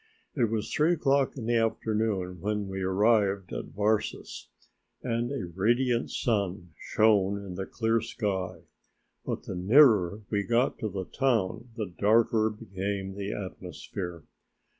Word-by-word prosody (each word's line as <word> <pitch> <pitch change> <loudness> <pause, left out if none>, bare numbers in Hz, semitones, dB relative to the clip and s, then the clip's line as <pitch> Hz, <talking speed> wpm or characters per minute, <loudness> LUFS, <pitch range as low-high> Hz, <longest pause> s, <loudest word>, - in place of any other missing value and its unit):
It 125 -5 +3
was 110 -1 -2
three 155 +3 +3
o'clock 140 -4 +1
in 120 - -5
the 120 0 +2
afternoon 110 -5 -1
when 105 0 -1
we 95 0 -4
arrived 100 -1 +2
at - - -4
Varses 105 +1 -2 0.6
and 120 0 -1
a 135 -9 -3
radiant 120 +5 +1
sun 100 -6 -1
shone 100 -1 +2
in 95 - -7
the 95 +2 -5
clear 115 -1 0
sky, 95 -6 -3 0.6
but - - -4
the - - -6
nearer 105 - +4
we 100 -2 +2
got 120 +4 +1
to 110 - -2
the 95 -1 -4
town 115 -2 0
the 110 -3 -2
darker 110 +1 +3
became 100 -2 -4
the 100 0 -4
atmosphere. 90 -2 -6
105 Hz, 140 wpm, -28 LUFS, 95-115 Hz, 0.6 s, nearer